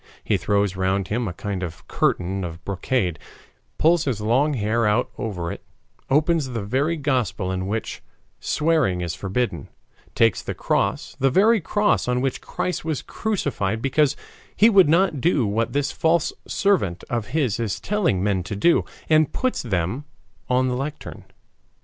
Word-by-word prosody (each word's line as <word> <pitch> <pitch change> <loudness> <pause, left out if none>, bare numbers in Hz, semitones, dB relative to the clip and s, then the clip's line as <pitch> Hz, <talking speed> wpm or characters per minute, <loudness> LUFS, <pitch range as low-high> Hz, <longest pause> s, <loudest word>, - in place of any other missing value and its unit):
He 105 - +1
throws 100 +1 +1
round 95 +1 0
him 115 +2 -1
a 90 - -4
kind 100 +1 -4
of 85 -4 -7
curtain 95 +2 0
of 85 -1 -7
brocade, 95 -2 -1 0.6
pulls 165 0 +3
his 125 -7 -1
long 130 +8 +2
hair 110 0 +1
out 105 +4 +1
over 90 -8 -3
it, - - -8 0.5
opens 155 +1 +2
the 115 -4 -4
very 140 +10 0
Gospel 125 -9 -1
in 95 0 -2
which 110 +3 -3 0.4
swearing 150 - +1
is 85 -2 -2
forbidden, 95 - -2 0.5
takes 115 -5 +3
the - - -5
cross, - - -1
the 135 - +3
very 210 - +4
cross 205 0 +1
on 125 0 +1
which 135 0 -1
Christ 180 -3 -3
was 155 -3 -2
crucified 140 - -2
because 140 +3 +2 0.4
he 220 +3 +6
would 190 -7 +6
not 165 -4 +3
do 150 -6 +2
what 110 +3 0
this 145 0 0
false 165 0 +1
servant 185 - +1
of 115 -3 -2
his 125 -5 0
is 110 -5 -2
telling 185 - 0
men 100 -2 +1
to 95 +3 -5
do, 170 +12 +3 0.2
and 155 -2 +4
puts 255 -1 -1
them 105 - -2 0.4
on 130 +1 +2
the 125 - -1
lectern. 145 +4 -6
120 Hz, 160 wpm, -23 LUFS, 100-150 Hz, 0.6 s, he